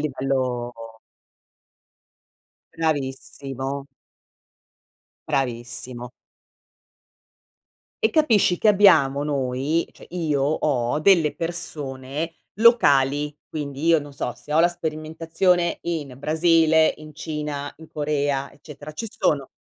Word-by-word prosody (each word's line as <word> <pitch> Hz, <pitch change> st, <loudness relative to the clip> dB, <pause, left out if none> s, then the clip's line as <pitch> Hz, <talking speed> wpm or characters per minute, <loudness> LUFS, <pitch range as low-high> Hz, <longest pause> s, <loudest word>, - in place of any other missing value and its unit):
livello 130 Hz, -4 st, -1 dB, 2.0 s
Bravissimo. 140 Hz, -3 st, -3 dB, 1.4 s
Bravissimo. 120 Hz, -1 st, -3 dB, 1.9 s
E 445 Hz, -, +4 dB
capisci 225 Hz, -, +3 dB
che 215 Hz, -, +3 dB
abbiamo 160 Hz, -9 st, +5 dB
noi 140 Hz, +3 st, -1 dB
cioè -, -, -15 dB
io 155 Hz, -6 st, -1 dB
ho 140 Hz, -3 st, 0 dB
delle 165 Hz, -3 st, +4 dB
persone 155 Hz, -2 st, -4 dB, 0.2 s
locali, 145 Hz, -, +4 dB
quindi 145 Hz, 0 st, -5 dB
io, 165 Hz, -1 st, +6 dB
non 145 Hz, -1 st, -9 dB
so, 125 Hz, -2 st, -4 dB
se 150 Hz, -, -9 dB
ho 160 Hz, -, +5 dB
la 175 Hz, -, +5 dB
sperimentazione 165 Hz, +2 st, -1 dB
in 155 Hz, -6 st, -4 dB
Brasile, 160 Hz, +1 st, +3 dB
in 155 Hz, -1 st, -12 dB
Cina, 150 Hz, -2 st, -4 dB
in 160 Hz, 0 st, -13 dB
Corea 145 Hz, -2 st, -1 dB
eccetera, 150 Hz, 0 st, -11 dB
ci 225 Hz, +9 st, -5 dB
sono 140 Hz, -3 st, 0 dB
150 Hz, 95 wpm, -23 LUFS, 135-165 Hz, 2.0 s, io